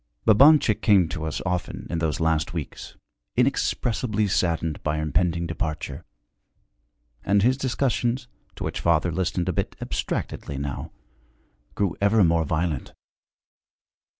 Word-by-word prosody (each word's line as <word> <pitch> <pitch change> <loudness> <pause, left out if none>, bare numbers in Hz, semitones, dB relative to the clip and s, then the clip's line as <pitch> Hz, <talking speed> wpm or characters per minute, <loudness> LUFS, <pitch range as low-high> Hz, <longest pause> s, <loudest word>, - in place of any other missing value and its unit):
Babanchik 130 0 +6
came 100 -6 +5
to 80 -2 -4
us 80 - -3
often 90 -1 -3
in 85 - -1
those 80 -1 -1
last 80 0 0
weeks, 75 -5 -6 0.4
inexpressibly 120 -4 +1
saddened 85 -4 0
by 75 0 -1
our 75 - -1
impending 85 +3 0
departure; 80 -2 -4 1.2
and 100 0 +3
his 125 +3 +4
discussions, 130 -1 -1 0.3
to - - -6
which - - -3
father 85 0 +2
listened 90 0 -1
a 90 - 0
bit - - -2
abstractedly 70 - -3
now, 70 -1 -4 0.8
grew 100 -4 0
ever 100 +1 +4
more 85 -1 +3
violent. 80 -2 -2
90 Hz, 125 wpm, -25 LUFS, 80-110 Hz, 1.2 s, Babanchik